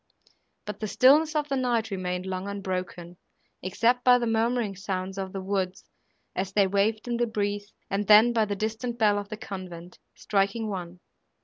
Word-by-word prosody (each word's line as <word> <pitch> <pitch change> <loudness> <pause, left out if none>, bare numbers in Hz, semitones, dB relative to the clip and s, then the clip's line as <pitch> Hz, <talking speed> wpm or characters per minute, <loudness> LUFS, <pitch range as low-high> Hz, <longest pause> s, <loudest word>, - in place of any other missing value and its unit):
But 210 -1 -6
the 215 - -3
stillness 300 +8 +5
of 300 -1 0
the 275 - -1
night 240 -4 0
remained 180 -1 -3
long 190 +1 -4
unbroken, 185 -3 -5 0.4
except 235 +7 +1
by 250 -1 +7
the 240 - -1
murmuring 225 -2 0
sounds 190 0 -4
of 190 -1 -4
the 195 -1 -5
woods, 190 -1 -2 0.5
as 190 +1 -3
they 200 -1 +4
waved 205 +4 0
in 240 -1 -1
the 240 0 +1
breeze, 205 -1 -2 0.2
and 200 0 -2
then 215 +3 +7
by 225 -2 +3
the 205 -1 -3
distant 220 +4 -3
bell 210 -3 +3
of 205 0 -7
the 215 - -5
convent, 185 -6 -8 0.2
striking 205 +2 0
one. 180 -2 -6
205 Hz, 180 wpm, -27 LUFS, 190-230 Hz, 0.5 s, by